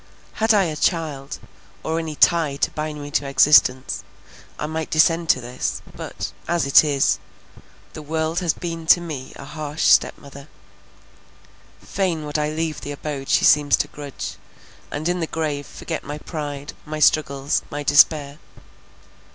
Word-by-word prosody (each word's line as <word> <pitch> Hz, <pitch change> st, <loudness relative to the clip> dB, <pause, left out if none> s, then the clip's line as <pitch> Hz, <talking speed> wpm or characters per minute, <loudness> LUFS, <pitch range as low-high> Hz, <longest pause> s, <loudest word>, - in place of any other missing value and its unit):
Had 220 Hz, +1 st, +4 dB
I 205 Hz, -3 st, +5 dB
a 160 Hz, -4 st, -2 dB
child, 150 Hz, -4 st, -1 dB, 0.5 s
or 160 Hz, +1 st, -1 dB
any 160 Hz, -2 st, -5 dB
tie 160 Hz, -3 st, +3 dB
to -, -, 0 dB
bind 150 Hz, 0 st, -4 dB
me 145 Hz, -, -8 dB
to 145 Hz, -1 st, 0 dB
existence, 135 Hz, -5 st, +4 dB, 0.5 s
I -, -, -3 dB
might 160 Hz, +1 st, -4 dB
descend 165 Hz, +1 st, +3 dB
to 130 Hz, -, +4 dB
this—but, 125 Hz, +1 st, -5 dB, 0.2 s
as 170 Hz, -3 st, +1 dB
it 140 Hz, -, +7 dB
is—the 135 Hz, -5 st, -4 dB
world 160 Hz, +2 st, -1 dB
has 175 Hz, -3 st, +1 dB
been 165 Hz, -1 st, -6 dB
to 175 Hz, -, +7 dB
me 150 Hz, -6 st, -6 dB
a 140 Hz, -, -10 dB
harsh 150 Hz, +1 st, -5 dB
step -, -, +4 dB
mother; 140 Hz, 0 st, -13 dB, 1.4 s
fain 175 Hz, -6 st, -2 dB
would 150 Hz, +1 st, -2 dB
I 150 Hz, 0 st, 0 dB
leave 160 Hz, 0 st, -3 dB
the 145 Hz, -, -5 dB
abode 140 Hz, -2 st, -6 dB
she -, -, +3 dB
seems 145 Hz, -1 st, +5 dB
to -, -, -1 dB
grudge, 145 Hz, -2 st, -7 dB, 0.5 s
and 150 Hz, +3 st, -3 dB
in 180 Hz, 0 st, 0 dB
the 165 Hz, -, -2 dB
grave 150 Hz, -3 st, -3 dB
forget 160 Hz, -, -6 dB
my 145 Hz, +1 st, -6 dB
pride, 145 Hz, -2 st, -6 dB
my 155 Hz, 0 st, -6 dB
struggles, 140 Hz, -2 st, +2 dB
my 145 Hz, 0 st, -5 dB
despair. 145 Hz, 0 st, +4 dB
150 Hz, 155 wpm, -22 LUFS, 140-160 Hz, 1.4 s, it